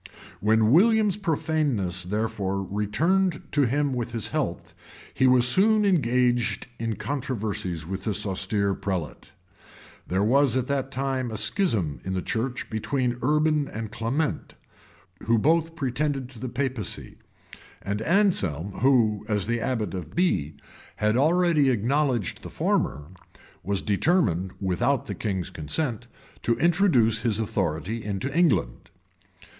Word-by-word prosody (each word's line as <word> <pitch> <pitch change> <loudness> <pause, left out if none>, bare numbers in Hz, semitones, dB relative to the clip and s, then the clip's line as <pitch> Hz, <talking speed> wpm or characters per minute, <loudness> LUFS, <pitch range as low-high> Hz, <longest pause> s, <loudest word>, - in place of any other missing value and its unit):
[*] - - -19
When 110 +1 +3
William's 210 - +4
profaneness 145 - -1
therefore 100 -1 -2
returned 155 - 0
to 145 -3 +3
him 140 +2 0
with 120 -1 -3
his 115 -3 -2
health, - - -3 0.4
he 130 - +3
was 125 -1 +5
soon 210 - +4
engaged 120 - +1
in 115 -1 -2
controversies 110 - -3
with 95 +2 -5
this 105 -1 0
austere 100 +1 0
prelate. 95 -5 -4 0.8
There 95 +2 0
was 130 +2 +3
at 130 - 0
that 135 -1 -2
time 135 -2 -2
a 110 - -5
schism 110 - 0
in 95 0 -3
the 90 - -1
church 120 +2 -2
between 120 +2 -1
Urban 150 +1 +2
and 110 -1 -6
Clement, 120 +8 -2 0.7
who 115 0 +4
both 165 +6 +2
pretended 135 -2 -2
to 125 -4 -12
the 130 - -4
papacy;[] 125 -4 -4 0.6
and 100 +2 -3
Anselm, 110 - +1
who, 115 -6 +3
as 105 -2 0
abbot 115 -4 -1
of 90 -3 -7
Bee, 80 - +1 0.4
had 105 +1 +1
already 160 0 +3
acknowledged 125 - 0
the - - -8
former, 75 +2 -1 0.5
was 100 0 -1
determined, 100 - +1
without 95 +8 0
the - - -5
king's 95 -5 -3
consent, 120 - -3 0.3
to 115 -1 +1
introduce 145 - +3
his 115 -3 0
authority 100 0 -2
into 105 +7 -3
England. 155 - +1
120 Hz, 130 wpm, -25 LUFS, 100-145 Hz, 0.8 s, was